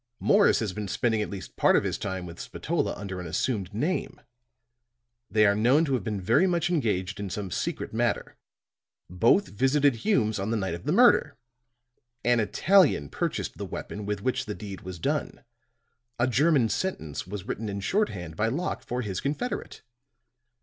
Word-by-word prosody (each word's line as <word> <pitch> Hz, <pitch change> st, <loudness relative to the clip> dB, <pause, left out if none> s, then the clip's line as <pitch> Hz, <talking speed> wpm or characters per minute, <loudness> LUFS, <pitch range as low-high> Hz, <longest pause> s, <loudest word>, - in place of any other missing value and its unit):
Morris 205 Hz, 0 st, +4 dB
has 105 Hz, -5 st, -2 dB
been 105 Hz, 0 st, -4 dB
spending 110 Hz, +2 st, 0 dB
at -, -, -3 dB
least 95 Hz, -4 st, -8 dB
part -, -, +4 dB
of -, -, +3 dB
his -, -, -1 dB
time 95 Hz, -2 st, -4 dB
with 85 Hz, -1 st, -10 dB
Spatola -, -, -2 dB
under 95 Hz, -2 st, -6 dB
an 90 Hz, -, -6 dB
assumed 95 Hz, +3 st, -1 dB
name; 150 Hz, -, -2 dB, 1.1 s
they 110 Hz, -1 st, +4 dB
are 100 Hz, -, +5 dB
known 125 Hz, +10 st, +3 dB
to 135 Hz, -, -1 dB
have 125 Hz, -6 st, 0 dB
been 105 Hz, 0 st, -2 dB
very 115 Hz, -, +3 dB
much 175 Hz, -1 st, 0 dB
engaged 105 Hz, -, -1 dB
in 100 Hz, -1 st, -4 dB
some 95 Hz, 0 st, -5 dB
secret -, -, -3 dB
matter. -, -, -1 dB, 0.8 s
Both 115 Hz, -, +3 dB
visited 135 Hz, +4 st, +2 dB
Hume's 110 Hz, -, +1 dB
on 100 Hz, +2 st, -2 dB
the 115 Hz, -, 0 dB
night 95 Hz, -4 st, -2 dB
of 85 Hz, +1 st, -7 dB
the -, -, 0 dB
murder. -, -, +5 dB, 0.9 s
An 120 Hz, -1 st, +3 dB
Italian 115 Hz, -, +3 dB
purchased -, -, -3 dB
the -, -, -3 dB
weapon 105 Hz, 0 st, -6 dB
with 105 Hz, -1 st, -3 dB
which 130 Hz, -, -1 dB
the 105 Hz, -, -4 dB
deed 100 Hz, -3 st, -8 dB
was 95 Hz, -1 st, -7 dB
done. 80 Hz, -, -2 dB, 0.7 s
A 120 Hz, -, +2 dB
German 135 Hz, 0 st, +3 dB
sentence 90 Hz, -, -3 dB
was 100 Hz, 0 st, -5 dB
written 110 Hz, 0 st, -4 dB
in 100 Hz, 0 st, -3 dB
shorthand 95 Hz, -, -1 dB
by 105 Hz, +6 st, +1 dB
Locke 160 Hz, +11 st, -2 dB
for 125 Hz, +1 st, -3 dB
his 95 Hz, -4 st, -3 dB
confederate. 150 Hz, -, -4 dB
105 Hz, 175 wpm, -27 LUFS, 95-135 Hz, 1.1 s, are